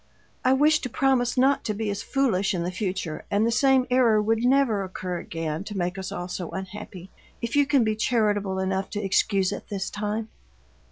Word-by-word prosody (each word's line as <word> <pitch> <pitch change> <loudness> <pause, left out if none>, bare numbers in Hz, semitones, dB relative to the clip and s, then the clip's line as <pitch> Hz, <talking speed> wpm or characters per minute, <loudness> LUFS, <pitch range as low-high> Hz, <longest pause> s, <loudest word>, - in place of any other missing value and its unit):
I 255 0 +4
wish 305 +3 +4
to 255 - -5
promise 260 -2 +1
not 270 +2 +3
to 215 - -1
be 215 0 -2
as 200 +1 -4
foolish 225 -9 +1
in 170 - -1
the 175 - -2
future, 185 -4 -3
and 205 +2 +2
the 230 - +1
same 265 +1 +4
error 240 -4 +4
would 225 +2 +1
never 250 -5 +3
occur 185 -1 -4
again 165 0 -4
to 205 -1 -6
make 180 0 -1
us 190 -1 -5
all 175 - -4
so 180 -1 -5
unhappy, 190 -1 -8 0.3
if 235 +3 -3
you 285 -1 +4
can 280 -4 +4
be 215 -1 0
charitable 210 -4 +1
enough 190 0 -1
to 210 - -2
excuse 195 0 +2
it - - -7
this 195 -2 -3
time." 210 +1 -3
210 Hz, 205 wpm, -25 LUFS, 190-245 Hz, 0.3 s, I